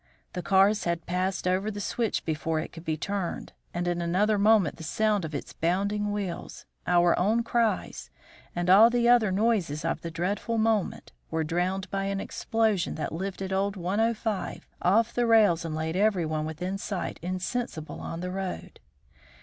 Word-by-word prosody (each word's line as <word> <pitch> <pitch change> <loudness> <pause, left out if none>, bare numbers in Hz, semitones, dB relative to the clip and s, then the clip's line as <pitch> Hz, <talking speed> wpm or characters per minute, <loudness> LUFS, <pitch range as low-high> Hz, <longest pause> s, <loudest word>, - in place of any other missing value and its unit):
The 180 - -3
cars 195 +3 +3
had 170 -1 -1
passed 185 +1 -1
over 185 +3 +1
the 205 -1 -5
switch 225 +2 -1
before 160 0 -1
it 155 - -6
could 165 - -10
be 160 -2 -2
turned, 195 +1 -4 0.2
and 175 0 -2
in 175 0 0
another 200 +5 +2
moment 210 -4 +4
the - - -9
sound 210 +4 +1
of 155 -2 -5
its 140 - -6
bounding 200 +5 0
wheels, 200 -4 -5 0.2
our 175 -1 +4
own 220 +5 +2
cries, 230 -1 -1 0.5
and 175 0 -1
all 205 +5 +8
the 240 0 +2
other 240 -5 +5
noises 185 -7 0
of 165 - -1
the 170 - -5
dreadful 195 +7 -2
moment, 220 -3 0 0.2
were 160 0 -1
drowned 180 +4 -1
by 195 -1 -1
an 195 0 -1
explosion 220 -3 0
that 155 - -4
lifted 190 +2 -4
old 195 +1 0
105 210 +3 -1 0.2
off 225 +6 +3
the 240 -1 +1
rails 210 -7 +5
and 160 -2 -4
laid 160 +1 -2
everyone 170 -7 +1
within 180 +5 -4
sight 195 -2 -4
insensible 185 -1 -4
on 165 - -5
the 180 0 -3
road. 190 -1 -5
190 Hz, 170 wpm, -27 LUFS, 170-210 Hz, 0.5 s, all